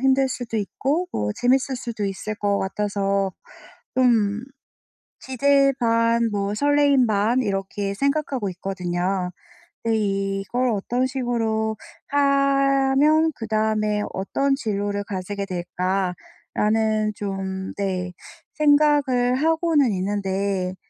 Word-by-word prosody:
힘들 265 0 +3
수도 245 -3 -4
있고 285 - -1
뭐 105 0 -1
재밌을 260 +2 +2
수도 235 -4 -4
있을 195 +2 -4
것 205 -1 0
같아서 200 -1 -1 0.6
좀 225 -4 +2 0.8
기대 275 +1 +3
반 230 0 +2
뭐 200 0 -1
설레임 285 -1 +3
반 215 +4 +2
이렇게 195 0 -2
생각하고 275 -4 -1
있거든요. 180 0 -2 0.5
근데 225 -1 +1
'이걸 195 +4 -1
어떤 240 +5 0
식으로 225 -4 -1 0.3
하면 275 +2 +3
그다음에 215 -1 0
어떤 270 +9 0
진로를 205 -5 -2
가지게 200 +1 -4
될까.'라는 195 +4 -1
좀 190 -2 -4
네 185 -2 -2 0.4
생각을 290 -4 +3
하고는 320 -2 +2
있는데 190 -1 -1
220 Hz, 220 characters per minute, -23 LUFS, 195-265 Hz, 0.8 s, 힘들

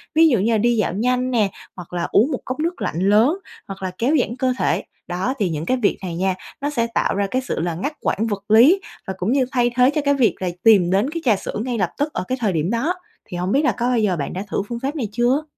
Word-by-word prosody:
Ví 325 +1 +6
dụ 240 -7 +2
như 215 +5 +1
là 225 - +3
đi 240 +3 +2
dạo 210 - 0
nhanh 250 +5 0
nè, 215 -5 +2 0.2
hoặc 180 -1 -10
là 175 -1 -1
uống 250 +9 +4
một 260 - -2
cốc 255 +4 -4
nước 340 +3 -2
lạnh 165 - -2
lớn, 235 - +4 0.3
hoặc 195 -1 -8
là 185 - -2
kéo 265 +7 +2
giãn 240 0 -1
cơ 255 -1 0
thể. - - +1 0.2
Đó, 185 +9 -1
thì 195 -4 +1
những 155 0 -3
cái 255 - +1
việc 220 -5 +1
này 175 -3 -4
nha, 185 +1 0 0.3
nó 290 - 0
sẽ 235 -5 0
tạo 230 - 0
ra 200 0 0
cái 255 - +1
sự 255 - -3
là 170 0 -2
ngắt 280 - -3
quãng 225 +3 0
vật 205 -1 -4
lý 260 - +7 0.3
và 190 - -2
cũng 190 +5 -1
như 265 -2 +3
thay 240 -2 +2
thế 250 +1 +5
cho 300 +1 0
cái 285 - +4
việc 260 -5 +2
là 185 -1 -1
tìm 205 -6 +6
đến 200 +9 +2
cái 335 +1 -4
trà 225 -5 +5
sữa - - -6
ngay 245 -2 -2
lập 185 -5 +1
tức 295 +1 -1
ở - - -2
cái 255 - -1
thời 210 -5 +1
điểm 160 +2 0
đó. 255 +10 0 0.3
Thì 175 - -7
hổng 180 +2 -2
biết 280 +6 +3
là - - +4
có 240 +1 -2
bao 245 -2 +2
giờ 205 -4 +1
bạn 140 - -4
đã 185 - -4
thử 195 - -1
phương 235 +1 -4
pháp 275 +5 -3
này 240 -8 -2
chưa? 245 +6 +1
230 Hz, 295 wpm, -21 LUFS, 190-260 Hz, 0.3 s, lý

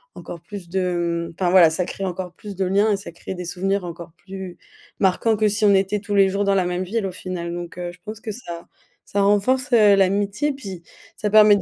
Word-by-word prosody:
encore 170 - -9
plus 200 -3 -9
de 175 -2 -1
mmh, - - -12
enfin 180 -2 +2
voilà, 180 -3 +7
ça 165 +3 -1
crée 195 - -5
encore 180 -1 -4
plus 205 +2 -9
de 190 +1 -1
liens 200 +4 +3
et 200 - +2
ça 195 - -9
crée 170 +3 -7
des 180 0 -6
souvenirs 195 +3 -1
encore 170 -1 -8
plus 190 -2 -8 0.4
marquants 195 +4 +2
que 215 - +3
si 210 +1 +1
on 200 - +6
était 195 +2 +1
tous 205 -1 -3
les 195 -1 +5
jours 200 +1 0
dans 200 0 +3
la 185 -2 +2
même 180 +1 -1
ville 205 +3 -2
au - - -4
final, 175 -2 -5
donc, 175 0 -7
heu, 175 -1 -4
je 180 - -18
pense 215 0 -7
que 225 -2 -4
ça 170 -7 -8 0.4
ça 200 - 0
renforce, 210 +7 +2
heu, 210 -3 +7
l'amitié, 200 +7 +1
puis 195 -10 -8 0.4
ça 210 - -1
permet 210 0 +7
de - - -3
195 Hz, 245 wpm, -22 LUFS, 180-205 Hz, 0.4 s, voilà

